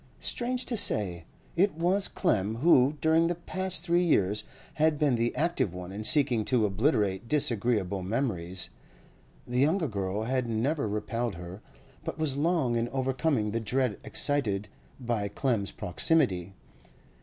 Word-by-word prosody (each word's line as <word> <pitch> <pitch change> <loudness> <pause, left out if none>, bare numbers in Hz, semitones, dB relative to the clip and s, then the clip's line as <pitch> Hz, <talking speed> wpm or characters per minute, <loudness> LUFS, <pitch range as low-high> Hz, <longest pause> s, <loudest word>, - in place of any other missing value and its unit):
Strange 250 +1 -1
to 245 - -1
say, 95 - 0 0.3
it 190 0 +2
was 180 +4 +2
Clem 110 - 0
who, 140 +1 +4
during 160 +1 +3
the 175 - -1
past 185 0 -1
three 175 0 +2
years, 105 - +2 0.3
had 155 -1 +2
been 145 -3 +2
the 120 0 0
active 140 - 0
one 90 0 -7
in 105 +2 -6
seeking 130 -4 +5
to 120 -1 +2
obliterate 105 -1 0
disagreeable 110 -8 +1
memories. 95 -4 -3 0.7
The 125 +1 -2
younger 160 +5 +2
girl 100 -2 -3
had 130 +1 -1
never 115 +3 -1
repelled 105 +2 -3
her, 90 +4 -9 0.4
but - - -5
was 155 -4 0
long 150 -5 +1
in 115 +1 -1
overcoming 130 -3 -1
the 115 - -1
dread 125 0 -1
excited 105 -9 0 0.3
by 115 -5 -2
Clem's 110 -4 -1
proximity. 95 - 0
120 Hz, 145 wpm, -28 LUFS, 105-155 Hz, 0.7 s, seeking